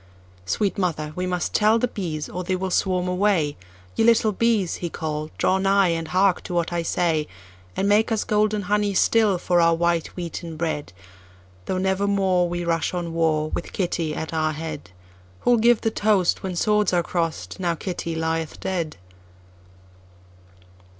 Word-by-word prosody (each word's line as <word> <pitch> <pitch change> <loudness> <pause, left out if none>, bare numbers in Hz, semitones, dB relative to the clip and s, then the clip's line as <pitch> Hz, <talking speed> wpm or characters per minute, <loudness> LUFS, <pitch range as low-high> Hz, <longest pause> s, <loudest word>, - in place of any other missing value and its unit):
"Sweet 200 - 0
mother, 155 -5 -2
we 180 0 -2
must 180 -2 -2
tell 215 +1 +4
the 250 - +1
bees, 165 -9 -4
or 180 - -5
they 185 +1 -1
will 185 0 -3
swarm 180 -1 +1
away:Ye 145 - -1
little 225 -1 +4
bees!" 215 -4 +1
he 175 - -4
called, 155 -1 -4
"draw 190 - +2
nigh, 195 -1 +3
and 165 -1 -2
hark 185 +1 +2
to 175 - -4
what 170 0 0
I 170 - 0
say, 165 -2 0 0.5
And 195 - 0
make 210 +3 +3
us 220 - +1
golden 210 0 +1
honey 205 0 0
still 215 -1 +3
for 175 0 +2
our 165 0 +4
white 170 -1 +1
wheaten 170 -2 -6
bread, 155 - -3 0.7
Though 185 - -2
never 190 +1 0
moreWe 180 -3 +1
rush 165 +1 0
on 170 -2 -3
warWith 160 0 -1
Kitty 170 -4 -1
at 160 - -5
our 155 -1 0
head:Who 95 - -5
'll - - +4
give 235 +1 +4
the 225 - 0
toastWhen 190 -3 +1
swords 210 0 +2
are 175 -1 +2
cross'd, 165 -1 -3
Now 175 -2 0
Kitty 170 -1 -4
lieth 160 -1 -2
dead?" 170 - -3
175 Hz, 160 wpm, -23 LUFS, 160-195 Hz, 0.7 s, tell